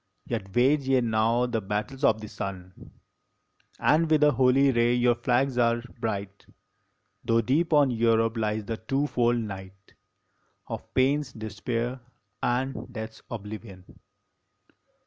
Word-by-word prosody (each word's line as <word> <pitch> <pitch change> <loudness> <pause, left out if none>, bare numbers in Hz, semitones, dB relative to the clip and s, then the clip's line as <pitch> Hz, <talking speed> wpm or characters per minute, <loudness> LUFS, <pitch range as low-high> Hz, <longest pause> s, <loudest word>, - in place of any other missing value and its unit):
Yet 95 -5 -5
wage 135 +3 +3
ye 130 -1 +4
now 115 +1 +2
the 115 -2 -2
battles 105 +7 -4
of 110 -5 +3
the 110 - -7
sun 95 -2 -8 0.9
And 160 +1 +3
with 155 -1 +4
a 150 - +6
holy 130 +2 +4
ray 120 0 +2
your 120 0 +3
flags 125 +2 0
are 115 0 +2 0.2
bright, 100 -3 -4 0.8
Tho 115 0 +2
deep 145 +9 +1
on 145 -4 +4
Europe 115 -1 +2
lies 110 -1 -1
the 115 +1 -3
two 135 +6 -1
fold 120 -4 +1
night 95 -3 -8 0.7
Of - - -7
pain 135 +3 +3
s 140 -3 -7
despair 115 +3 -4 0.4
and 130 +1 -2
death 110 -2 -6
s - - -18
oblivion. 105 -3 -8
120 Hz, 140 wpm, -27 LUFS, 110-130 Hz, 0.9 s, a